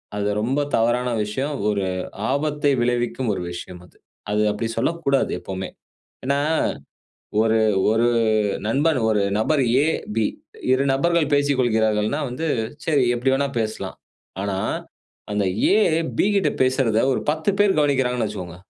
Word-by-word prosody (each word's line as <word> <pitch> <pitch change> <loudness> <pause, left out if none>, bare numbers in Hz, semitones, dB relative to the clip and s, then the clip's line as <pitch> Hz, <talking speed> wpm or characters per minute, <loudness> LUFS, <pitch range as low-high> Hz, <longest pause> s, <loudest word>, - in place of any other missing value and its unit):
அது 100 0 -1
ரொம்ப 130 +6 0 0.2
தவறான 120 +2 +1
விஷயம். 135 +8 -3
ஒரு 100 -2 0 0.5
ஆபத்தை 145 0 0
விளைவிக்கும் 120 0 0
ஒரு 95 - -4
விஷயம் 90 0 -8
அது. - - -23 0.3
அது 105 - +1
அப்டி 115 +2 -3
சொல்லக்கூடாது 160 -5 0
எப்பவுமே. 95 0 -5 0.6
ஏனா, 140 +1 +1 1.0
ஒரு 110 0 +3 0.3
1 115 +2 +3 0.6
நண்பன் 140 +5 +2
1 105 -2 +2 0.2
நபர் 140 +5 +2 0.2
எ, - - +1 0.3
பி 110 - +2 0.5
2 130 +1 +2
நபர்கள் 160 +1 +1
பேசிக்கொள்கிறார்கள்னா, 120 -3 +1
வந்து 125 +7 -4 0.4
சரி 145 -5 +2
எப்டி 125 +2 0
வேணா 140 +1 0
பேசலாம். 110 0 -4 0.5
ஆனா 100 -1 -2 0.7
அந்த 105 -1 +1 0.3
ஏ, 205 - +5 0.4
பி - - +4
கிட்ட 185 -7 +2
பேசுறத 130 -4 +2
ஒரு - - -1
10 160 +5 0
பேர் 205 -1 +4
கவனிக்கிறாங்கன்னு 130 -5 +1
வச்சுக்கோங்க. 90 -4 -7
125 Hz, 130 wpm, -22 LUFS, 110-145 Hz, 1.0 s, ஏ